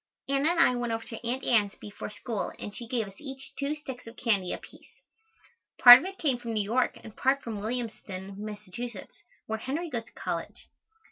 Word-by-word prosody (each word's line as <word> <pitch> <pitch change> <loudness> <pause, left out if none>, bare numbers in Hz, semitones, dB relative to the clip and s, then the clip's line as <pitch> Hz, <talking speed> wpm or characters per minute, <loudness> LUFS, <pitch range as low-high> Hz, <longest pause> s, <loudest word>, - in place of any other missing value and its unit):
Anna 275 +3 +2
and 340 0 +1
I 250 - +6
went 240 -1 -2
over 225 0 -2
to 225 - -8
Aunt 255 +2 -1
Ann's 210 -4 +3
before 205 0 -8
school 210 +1 -3
and 205 - -7
she 235 - -6
gave 230 -3 -1
us 195 0 -14
each 270 -1 -9
two 285 +2 0
sticks 265 -5 -9
of 230 - -11
candy 200 -6 +1
apiece. - - -9 0.9
Part 245 0 +13
of - - -6
it 390 +1 -6
came 270 -6 +1
from 235 -1 -4
New 215 -2 +2
York 240 +5 +1
and 220 -2 -11
part 270 +1 +2
from 220 -3 -4
Williamstown, 210 -4 -4
Mass., 210 -1 -7 0.8
where 220 0 -3
Henry 300 +8 -3
goes 230 -3 -3
to - - -18
college. - - -5
235 Hz, 200 wpm, -29 LUFS, 215-265 Hz, 0.9 s, Part